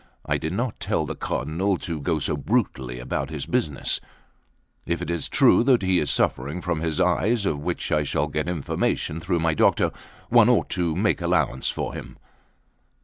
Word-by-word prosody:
I - - 0
did 80 +2 -3
not 120 +3 -2
tell - - 0
the - - -4
Cardinal 90 +7 -1
to 80 -3 -5
go 80 +2 0
so 75 - -1
brutally 70 - -1
about 65 +2 -3
this 75 -2 -5
business. 70 -4 0 0.9
If 85 -1 0
it 90 - -3
is 85 -4 -2
true - - +5
that 125 -6 +4
he 95 -1 +3
is 75 - 0
suffering 70 +7 0
from 85 -3 -2
his 80 -2 -1
eyes, 110 +2 +2
of 75 -6 0
which 75 - -3
I 75 - +3
shall 75 0 0
get 75 +1 -3
information 80 -1 -1
through 85 0 -1
my 80 -1 +2
doctor, - - +3 0.4
one - - +6
ought - - +2
to 85 -4 0
make 105 +4 +1
allowance 65 - +1
for - - -3
him." - - -9
80 Hz, 185 wpm, -24 LUFS, 75-90 Hz, 0.9 s, one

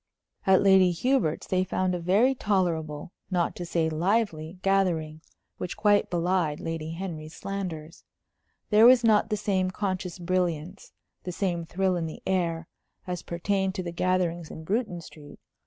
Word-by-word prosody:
At 190 0 +5
Lady 190 -2 +6
Hubert's 180 - 0
they 185 0 +1
found 185 0 -1
a 180 - -2
very 200 +10 +3
tolerable, 170 - -1 0.2
not 175 -3 0
to 175 - -5
say 165 -1 +1
lively, 170 0 0
gathering, 170 -6 +1 0.4
which 180 - -5
quite 205 -1 +3
belied 175 -3 0
Lady 165 -1 -4
Henry's 165 -3 -6
slanders. 180 -4 -6 0.7
There 215 +2 +7
was 250 -1 +6
not 220 -1 +4
the 210 - 0
same 195 -3 0
conscious 185 -2 -3
brilliance, 180 0 -2 0.3
the 180 - -5
same 175 -2 -2
thrill 185 +2 0
in 165 -1 -2
the 160 - -9
air, 170 -3 -1 0.4
as 180 -1 -4
pertained 190 +2 -1
to 185 - -3
the 170 - -4
gatherings 175 -2 0
in 160 - -9
Bruton 195 -1 -2
Street. 150 -3 -13
180 Hz, 155 wpm, -27 LUFS, 165-195 Hz, 0.7 s, There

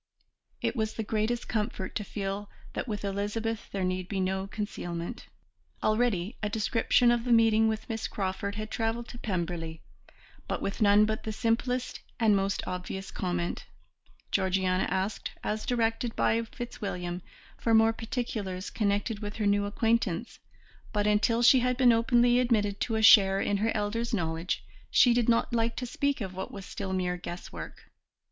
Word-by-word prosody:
It - - 0
was 220 -2 -1
the 220 - -2
greatest 220 +3 -1
comfort 210 -3 -2
to 210 - -2
feel 200 0 -4 0.2
that - - -3
with 210 -2 -3
Elizabeth 210 +3 -2
there 195 -1 -2
need 185 0 -1
be 195 - -2
no 190 +1 -1
concealment. 195 -1 -5 0.6
Already 215 -2 +1
a 210 - -1
description 230 +3 +3
of 240 -1 +1
the 245 - -1
meeting 225 -1 +5
with 220 0 -2
Miss 225 -1 -3
Crawford 200 +1 -3
had 215 +1 -5
travelled 230 +1 -1
to 240 - -9
Pemberley, 170 -5 -3 0.6
but - - -2
with 200 +3 -4
none 205 0 +6
but 220 0 -2
the 220 - -4
simplest 245 +3 -1 0.2
and 220 -3 +4
most 195 0 0
obvious 185 +1 -5
comment; 175 -2 -3 0.6
Georgiana 190 -1 +1
asked, 190 +3 -2
as 215 0 -2
directed 230 -1 0
by 230 - +2
Fitzwilliam, 200 -7 -5 0.4
for 225 -1 +3
more 225 0 +5
particulars 220 -5 -4
connected 205 0 0
with 205 0 -5
her 215 - -1
new 205 0 +3
acquaintance, 225 -1 0 0.5
but 205 -1 0
until 215 +3 +3
she 255 +2 +7
had 250 0 +1
been 255 -2 +6
openly 240 +1 +4
admitted 210 -5 +1
to 225 - -1
a 220 - 0
share 195 -3 +8
in 200 0 +1
her 220 +3 +1
elders' 225 +3 -1
knowledge 165 -1 -2 0.3
she 245 - +6
did 240 -1 +2
not 235 +1 +2
like 230 0 +1
to 250 - -3
speak 280 +2 -1
of 190 -2 -4
what 190 - -5
was 195 -1 -8
still 195 -1 -5
mere 180 -1 -1
guesswork. 175 0 -8
210 Hz, 165 wpm, -29 LUFS, 195-230 Hz, 0.6 s, share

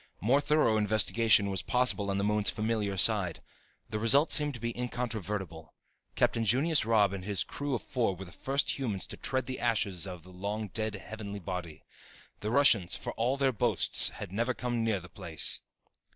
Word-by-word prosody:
More 130 +8 +2
thorough 145 -6 +2
investigation 110 -1 +3
was 95 -2 -1
possible 125 -5 +1
on 100 - -1
the 100 - -1
moon's 105 0 +2
familiar 105 -2 -2
side. 95 -3 +3 0.5
The 110 - -4
results 135 +8 +4
seemed 150 -2 +3
to - - -9
be 115 +1 -4
incontrovertible. 105 -9 -5 0.4
Captain 115 - +1
Junius 140 +7 +3
Robb 105 -3 +3
and 95 -2 -6
his 100 -2 -1
crew 145 -2 -4
of - - -5
four 120 -9 -1
were 95 +2 -9
the 90 - -13
first 140 +6 -1
humans 110 -8 -2
to - - -8
tread 130 -1 -1
the 130 0 -5
ashes 100 -6 0
of 90 -3 -8
the 90 - -15
long 100 +3 -4
dead 110 +1 -2
heavenly 100 +1 -7
body. 90 -4 -6 0.6
The 105 - -4
Russians, 115 -8 +4
for - - -6
all 125 +4 -1
their 135 -1 +2
boasts, 105 - +3
had - - -9
never 120 +5 -1
come 120 -2 -2
near 110 -3 0
the 90 - -12
place. - - 0
110 Hz, 185 wpm, -30 LUFS, 100-125 Hz, 0.6 s, results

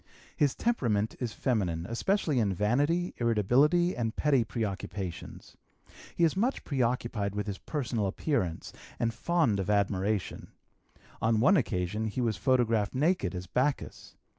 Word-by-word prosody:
His 145 -3 +2
temperament 115 - 0
is 120 -3 -2
feminine, 95 -10 -1
especially 150 - 0
in 100 -4 +1
vanity, 145 - +1
irritability, 125 - +3
and 115 -2 -2
petty 140 -5 +3
preoccupations. 100 -5 -5 0.6
He 170 - +1
is 165 0 +3
much 235 +8 0
preoccupied 120 -6 -1
with 105 - -2
his 100 -2 -5
personal 120 -8 -2
appearance 95 - -2 0.2
and 115 -1 0
fond 160 - +1
of 95 +1 -2
admiration; 100 0 0 0.7
on 110 -1 +2
one 185 - +5
occasion 105 - -1
he 110 - -4
was 115 -3 +1
photographed 115 -3 +1
naked 140 - +1
as 90 0 -5
Bacchus. 130 +9 -2
115 Hz, 135 wpm, -29 LUFS, 100-145 Hz, 0.7 s, one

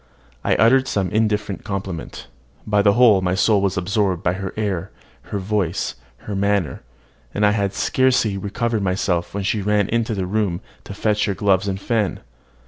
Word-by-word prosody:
I - - +2
uttered 130 +5 +4
some 95 -3 -1
indifferent 105 -2 0
compliment: 95 -4 -5 0.4
but 105 -1 +2
my - - +7
whole 100 -6 +4
soul 105 0 +3
was 100 -1 0
absorbed 95 -1 0
by 90 - +2
her 95 0 -4
air, 95 -4 -2 0.4
her 105 - -2
voice, 95 -3 -1 0.3
her 105 - -4
manner; 100 -3 0 0.5
and 105 - +2
I 105 - +5
had 100 -2 -1
scarcely 125 -5 +2
recovered 110 +3 -2
myself 90 -2 -1
when 100 - -2
she 105 +1 0
ran 105 0 +1
into 115 -1 0
her 95 -2 -2
room 95 -2 -1 0.3
to 100 - -8
fetch 105 0 +1
her 100 -2 -1
gloves 100 -1 +2
and 95 -1 -2
fan. 110 -2 -1
100 Hz, 170 wpm, -21 LUFS, 95-105 Hz, 0.5 s, my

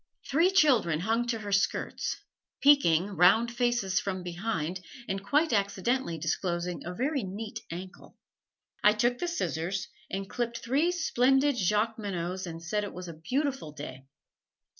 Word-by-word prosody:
Three 330 +6 +4
children 245 - +3
hung 225 +5 0
to 235 -1 0
her 205 -2 -6
skirts, 200 +1 0 0.4
peeking, 205 - +5
round 200 +5 +4
faces 240 -6 +1
from 185 -2 -3
behind, 175 -1 -3 0.3
and 195 0 -3
quite 295 +6 +2
accidentally 200 0 0
disclosing 175 +2 -2
a 175 - -5
very 275 - 0
neat 210 +3 -5
ankle. 185 +2 -9 0.7
I 210 - +7
took 240 +3 +1
the 350 - -1
scissors 185 - -2 0.2
and 195 0 -4
clipped 235 +2 -3
three 285 +9 +1
splendid 270 -4 +3
Jacqueminots 200 -4 -1
and 165 0 -7
said 210 +5 -1
it 205 - -5
was 180 0 -7
a - - -6
beautiful 255 - -2
day. 135 -2 -9
205 Hz, 140 wpm, -29 LUFS, 180-245 Hz, 0.7 s, I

